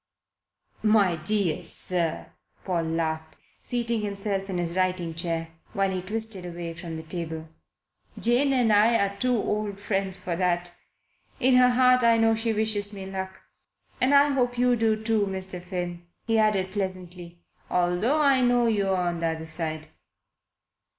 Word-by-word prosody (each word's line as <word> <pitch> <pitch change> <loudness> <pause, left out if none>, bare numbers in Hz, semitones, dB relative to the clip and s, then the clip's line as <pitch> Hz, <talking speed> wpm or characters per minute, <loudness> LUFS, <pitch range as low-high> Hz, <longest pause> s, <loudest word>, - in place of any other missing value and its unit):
"My 210 -5 +3
dear 175 0 0
sir," 170 -3 +1 0.3
Paul 175 -3 -1
laughed, 160 -1 -3 0.2
seating 235 -2 -2
himself 200 -1 -3
in 185 - -2
his 170 0 -3
writing 185 -3 -1
chair, 165 -1 -3 0.2
which 195 -1 0
he 185 - -2
twisted 215 0 -3
away 170 -1 -6
from 165 -1 -7
the 160 - -7
table, 160 -1 -5 0.7
"Jane 245 +4 +3
and 245 -5 +3
I 215 +3 +4
are 200 -1 -1
too 250 +3 +1
old 210 -1 -2
friends 195 -2 0
for 180 -1 -4
that. 175 -1 0 0.7
In 255 0 +4
her 250 0 +6
heart 250 0 +4
I 230 -1 +5
know 225 0 +3
she 225 +1 -1
wishes 215 -2 +1
me 195 -2 -8
luck. 190 0 -6 0.6
And 265 +3 +4
I 285 +1 +6
hope 245 -3 0
you 245 0 +3
do 225 -1 +2
too, 220 -2 +1
Mr. 190 -1 -3
Finn," 175 -1 -5 0.2
he 225 -1 +2
added 200 -3 +1
pleasantly 180 -3 -6 0.3
"although 180 - +1
I 275 -2 +4
know 245 -1 +3
you're 200 -4 +1
on 175 -1 -1
the 165 - 0
other 160 0 -4
side." 160 -1 -3
195 Hz, 155 wpm, -26 LUFS, 175-225 Hz, 0.7 s, her